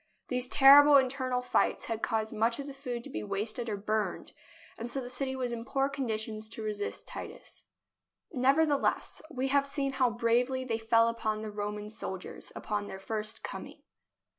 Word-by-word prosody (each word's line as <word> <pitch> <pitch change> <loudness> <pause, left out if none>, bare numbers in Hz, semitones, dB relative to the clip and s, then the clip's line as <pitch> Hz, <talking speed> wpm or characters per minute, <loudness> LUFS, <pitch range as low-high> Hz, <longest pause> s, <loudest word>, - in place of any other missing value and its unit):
These 250 0 +2
terrible 285 +2 +8
internal 255 -1 0
fights - - +1
had 225 -1 -3
caused 220 -1 -1
much 225 +2 +1
of 280 - -5
the 280 - -7
food 250 -3 -5
to - - -9
be 105 - -3
wasted 215 - -2
or 205 - -2
burned, 215 +1 -2 0.4
and 235 +1 -5
so 270 - 0
the 250 -1 -6
city 265 +1 -2
was 250 -2 -2
in 230 -1 -4
poor 270 +2 0
condition 220 -5 -3
to 220 +1 -7
resist 210 -1 -3
Titus. - - -9 0.7
Nevertheless, 280 +3 +2
we 270 -3 -2
have 280 0 +3
seen 275 -1 -1
how 260 -2 +2
bravely 240 +3 +1
they 225 -3 -1
fell 230 +1 +4
upon 220 -2 -2
the 215 - -5
Roman 210 0 -4
soldiers 190 -4 -6
upon 205 -1 -3
their 190 - -6
first 215 +2 -4
coming. - - -7
235 Hz, 175 wpm, -30 LUFS, 215-265 Hz, 0.7 s, terrible